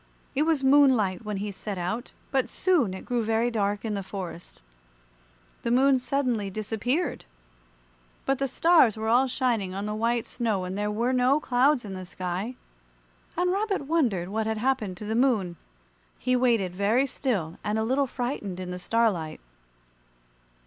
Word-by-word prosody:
It 295 +3 +1
was 300 -4 +1
moonlight 260 -9 +4
when 210 -2 -3
he 205 +1 -3
set 200 0 -6
out, 185 +8 -3 0.2
but 265 -2 +1
soon 290 - +1
it - - -9
grew 240 -2 0
very 225 +2 +1
dark 205 -1 -1
in 215 - -1
the 200 - -2
forest. 180 -3 -7 1.0
The - - -2
Moon 260 +2 +4
suddenly 250 -6 -1
disappeared. 225 - -2 1.0
But 270 -1 +1
the 275 - +1
stars 310 - +4
were 220 0 -3
all 250 +3 +4
shining 235 -7 -1
on 200 +1 -3
the 210 - -2
white 230 +2 0
snow 220 -6 -1
and 185 +1 -4
there 210 +1 -1
were 235 +5 0
no 255 +3 +3
clouds 260 -1 +2
in 195 - -6
the 185 0 -6
sky, 185 +6 -4 0.8
and 360 +1 +2
Rabbit 395 -5 -1
wondered 240 - +1
what 220 +2 -1
had 220 0 -1
happened 220 -6 -1
to 210 - -7
the 215 - -2
Moon. 225 -8 +2 0.6
He 255 - +1
waited 230 -8 +2
very 210 +8 +2
still 215 - -2
and 210 +1 -1
a 220 - +1
little 265 +4 +1
frightened 240 -8 -4
in 180 -1 -5
the 180 - -5
starlight. 190 -7 0
225 Hz, 170 wpm, -27 LUFS, 200-260 Hz, 1.0 s, moonlight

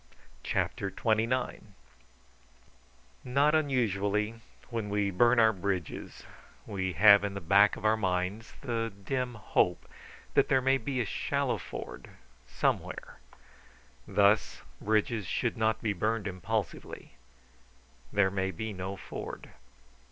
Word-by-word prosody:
CHAPTER 100 - -1
XXIX 115 +5 0 1.6
Not 140 +4 +3
unusually, 110 - 0 0.3
when 115 -3 -3
we 100 -1 0
burn 120 +6 +4
our 110 -1 +5
bridges, 95 -3 -4 0.4
we 95 -3 -3
have 100 +1 +7
in 100 -1 -3
the - - -3
back 100 +4 +5
of - - -8
our 110 +1 +5
minds 95 +1 -2
the 115 -3 -2
dim 125 +1 -2
hope 90 -4 0 0.5
that - - +4
there 130 - +4
may 135 +1 +2
be 130 +1 -2
a - - -1
shallow - - -1
ford - - -8 0.4
somewhere. 60 - -2 0.9
Thus, 100 0 +2 0.2
bridges 110 -1 0
should 120 +5 -1
not 110 0 0
be 110 -2 +1
burned 110 +2 -1
impulsively; 100 -5 -4 1.0
there 100 -2 +3
may 95 -1 -1
be 110 +2 -5
no 95 +1 -5
ford. - - -8
105 Hz, 120 wpm, -30 LUFS, 100-115 Hz, 1.6 s, have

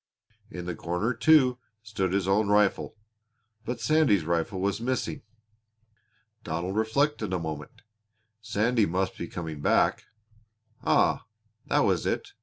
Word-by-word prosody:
In 90 -5 -7
the 90 - -3
corner, 90 +9 -2
too, 130 0 +4 0.2
stood 100 -4 -2
his 95 -1 0
own 100 +2 +2
rifle. 105 0 +2 0.7
But 125 - -3
Sandy's 145 - +3
rifle 85 +3 -1
was 100 +3 -1
missing. 125 +1 -2 1.2
Donald 85 +4 -3
reflected 110 0 0
a - - +1
moment. 80 0 -7 0.6
Sandy 110 +1 +1
must 95 +2 -1
be 85 - -6
coming 80 -4 -6
back. - - +2 0.8
Ah, - - +2 0.4
that - - +2
was - - +1
it! - - -2
100 Hz, 125 wpm, -27 LUFS, 90-115 Hz, 1.2 s, too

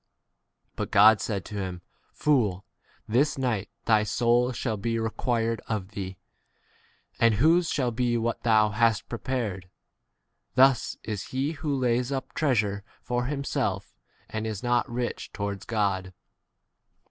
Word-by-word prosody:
But - - -3
God 105 +2 +6
said 100 -4 -3
to 105 - -8
him, 90 -3 -4 0.3
Fool, 110 -11 +1 0.4
this 135 +8 +2
night 120 -7 -1 0.2
thy 110 -1 +5
k 105 - -1
soul 120 +4 +2
shall 120 -2 -2
be 115 +3 -2
required 115 0 -1
of 105 -4 -3
thee; 95 -2 -6 1.0
and 115 -2 +4
whose 165 - +4
shall 125 -4 0
be 120 0 0
what 115 0 -1
thou 110 -2 +4
hast 115 0 +1
21 - - -43
prepared? 110 -6 -3 0.9
Thus 130 -1 +4
is 105 -2 -4
he 135 +3 -2
who 150 -3 -2
lays 125 0 +1
up 135 -1 -4
treasure 105 -9 +1 0.2
for 120 0 -1
himself, 135 -8 -2 0.3
and 110 0 -4
is 110 -3 -5
not 120 0 +1
rich 120 0 -3
towards 100 -1 -4
God. 100 -4 -1
115 Hz, 140 wpm, -27 LUFS, 105-125 Hz, 1.0 s, God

